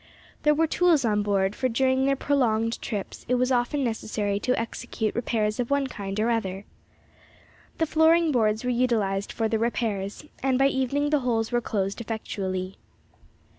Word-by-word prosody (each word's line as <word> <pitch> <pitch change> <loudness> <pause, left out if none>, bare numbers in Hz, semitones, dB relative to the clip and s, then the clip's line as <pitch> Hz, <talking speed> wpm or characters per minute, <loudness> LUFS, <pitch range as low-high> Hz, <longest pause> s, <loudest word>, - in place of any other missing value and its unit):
There 300 0 +4
were 325 +2 +3
tools 325 -4 +3
on 210 -2 +2
board, 200 -1 +1
for 255 - 0
during 260 +2 +2
their 275 - +3
prolonged 230 -5 0
trips 205 -4 -5
it 250 - +3
was 250 +1 +1
often 250 +3 +1
necessary 215 -3 -2
to 250 +3 0
execute 230 -1 -3
repairs 220 -2 -1
of 240 - -1
one 280 -1 +2
kind 200 -5 -5
or 230 +2 +2
other. 195 -3 -2 1.1
The 325 - +2
flooring 320 +1 +4
boards 220 -3 +1
were 250 - 0
utilised 220 -6 0
for 225 - -1
the 220 0 0
repairs, 215 -1 -2 0.2
and 265 -1 +2
by 270 +1 +4
evening 280 +2 0
the 300 - +3
holes 230 -3 -1
were 240 0 +1
closed 200 -1 -2
effectually. 190 -4 -4
235 Hz, 170 wpm, -26 LUFS, 210-265 Hz, 1.1 s, There